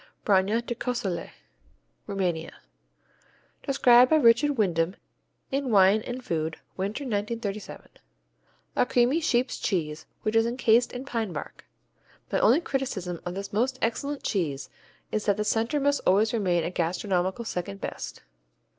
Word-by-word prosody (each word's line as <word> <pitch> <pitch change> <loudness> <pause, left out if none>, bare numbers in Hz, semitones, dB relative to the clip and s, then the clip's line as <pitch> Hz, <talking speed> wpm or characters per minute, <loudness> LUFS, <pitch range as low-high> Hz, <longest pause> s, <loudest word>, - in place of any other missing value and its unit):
Branja 205 +4 +2
de 240 - -2
Cosulet 225 -8 -3 0.8
Rumania 175 -5 -2 1.1
Described 250 -2 +5
by 315 - +5
Richard 280 +1 +4
Wyndham 175 -3 +1 0.6
in 275 -1 -1
Wine 200 0 +5
and 250 +2 -6
Food 160 -1 -2 0.2
(Winter, 200 +8 -3
1937): 210 -3 -4 0.9
A - - +3
creamy 250 +7 +3
sheep's 255 -5 +1
cheese 155 -5 -2 0.2
which 215 0 -1
is 225 0 +4
encased 235 -1 +3
in 250 +2 -6
pine 230 -7 -2
bark. 150 - -8 0.7
My - - +2
only 260 +9 +5
criticism 195 - -3
of 175 - -4
this 200 +1 -6
most 255 +5 +1
excellent 280 +5 -2
cheese 150 -8 -2 0.4
is 215 0 -2
that 205 -1 +3
the 210 - -1
center 230 +7 +1
must 285 +1 +1
always 210 +4 +4
remain 180 -7 +1
a 170 - -2
gastronomical 185 +4 -1
second 175 - -4
best. - - -6
215 Hz, 135 wpm, -27 LUFS, 185-245 Hz, 1.1 s, Described